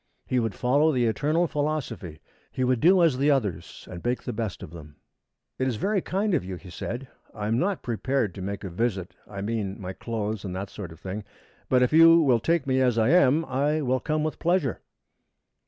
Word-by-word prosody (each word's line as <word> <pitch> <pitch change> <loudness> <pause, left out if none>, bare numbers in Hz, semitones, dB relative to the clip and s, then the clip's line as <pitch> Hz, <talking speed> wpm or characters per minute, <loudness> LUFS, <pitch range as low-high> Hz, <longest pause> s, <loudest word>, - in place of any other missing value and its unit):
He 130 - +1
would 115 -3 -2
follow 145 +5 +3
the 125 -4 +1
eternal 150 +9 +1
philosophy. 145 - -3 0.3
He 130 - -2
would 125 -1 +2
do 180 +4 +5
as 145 -6 +3
the 145 +2 +3
others 100 - -1
and 85 - -8
make 125 +1 -1
the 125 - -4
best 110 -3 -4
of - - -9
them. 75 -3 -11 0.6
"It 130 - +1
is 125 - -1
very 195 - 0
kind 195 +3 -1
of 165 - +1
you," 95 0 -5
he 90 0 -12
said. 120 +8 -5 0.3
"I 105 - -4
am 115 +3 +1
not 195 +3 -1
prepared 120 -3 -1
to 95 - -8
make 100 +1 -4
a 95 - -5
visit, 95 -2 -2 0.2
I 100 -1 -6
mean 105 -2 -3
my 95 -1 -5
clothes, 110 -1 -4
and 95 -3 -5
that 95 +1 -5
sort 95 -6 -7
of 80 - -13
thing, 95 +4 -5 0.5
but 125 -1 +4
if 125 - +1
you 165 +1 +8
will 130 -7 +4
take 165 +4 +1
me 130 -1 +1
as 125 -3 +2
I 110 +2 +3
am, 160 -1 +4
I 145 +3 0
will 130 0 +1
come 155 +1 -1
with 155 - -3
pleasure." 170 - 0
125 Hz, 220 wpm, -26 LUFS, 100-150 Hz, 0.6 s, you